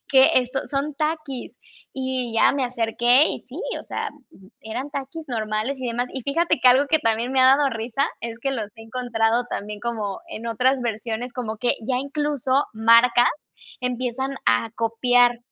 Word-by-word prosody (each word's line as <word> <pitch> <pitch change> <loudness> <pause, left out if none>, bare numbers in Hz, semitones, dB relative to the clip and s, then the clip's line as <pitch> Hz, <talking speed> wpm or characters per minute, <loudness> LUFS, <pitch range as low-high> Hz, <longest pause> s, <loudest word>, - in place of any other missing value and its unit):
que, 265 -1 +6
eh, 255 - +4
son 270 - -3
son 285 +1 -2
Takis", 305 -3 -4 0.3
y 260 -2 -3
ya 225 - +5
me 275 -2 0
acerqué, 240 +3 +4
y - - -4
sí, - - -11 0.2
o - - -9
sea, 450 -1 -4 0.5
eran 245 +6 -5
Takis 280 +3 -6
normales 220 +3 -2
y 255 - -3
demás. 240 +2 -2
Y 265 - -4
fíjate 330 +6 +1
que 255 - +6
algo 260 +3 +5
que 315 +2 +3
también 230 -1 0
me 265 - +3
ha 260 +1 +7
dado 285 -1 +1
risa 235 +4 -1
es 230 0 -6
que 275 +3 -2
los 230 -6 -3
he 225 - -11
encontrado 230 0 0
también 210 -1 -5
como 215 -4 -3
en 235 -8 -7
otras 255 +4 +1
versiones, 230 +1 -3
como 225 -3 -4
que 240 +3 +1
ya, 255 - 0
incluso, 280 -1 0
marcas 235 +2 +5 0.5
empiezan 250 +2 -2
a 115 0 +2
copiar 245 +1 +3
250 Hz, 180 wpm, -23 LUFS, 230-270 Hz, 0.5 s, ha